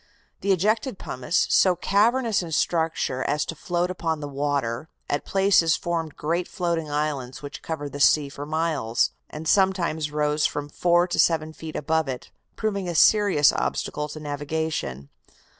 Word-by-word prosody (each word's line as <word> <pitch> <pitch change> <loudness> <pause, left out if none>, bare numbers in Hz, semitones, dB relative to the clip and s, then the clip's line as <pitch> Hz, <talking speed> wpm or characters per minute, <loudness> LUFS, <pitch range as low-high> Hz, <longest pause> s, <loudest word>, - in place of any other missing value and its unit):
The 200 - 0
ejected 215 +5 +1
pumice, 130 +4 -1
so 185 -2 +5
cavernous 220 +4 +2
in 170 -2 -7
structure 160 -6 0
as 150 +1 0
to - - -4
float 175 +3 -1
upon 165 -3 -2
the 145 - -5
water, 140 -2 -2 0.2
at 145 - -2
places 190 -4 +3
formed 165 -3 -3
great 170 +4 -1
floating 170 -4 -2
islands 145 -3 -3
which 145 - -7
covered 145 -3 -5
the 145 - -7
sea 145 +1 +5
for 140 +1 -8
miles, 155 -8 0 0.2
and 155 +1 -7
sometimes 175 -5 +2
rose 150 0 +1
from 145 0 -5
four 175 +3 +3
to 175 - -2
seven 160 -2 +2
feet 160 0 -8
above 160 +1 0
it, 130 -2 -6 0.2
proving 200 -4 -2
a 170 - -3
serious 195 -5 +5
obstacle 150 0 -2
to 155 - -7
navigation. 145 - -3
160 Hz, 160 wpm, -24 LUFS, 145-175 Hz, 0.2 s, so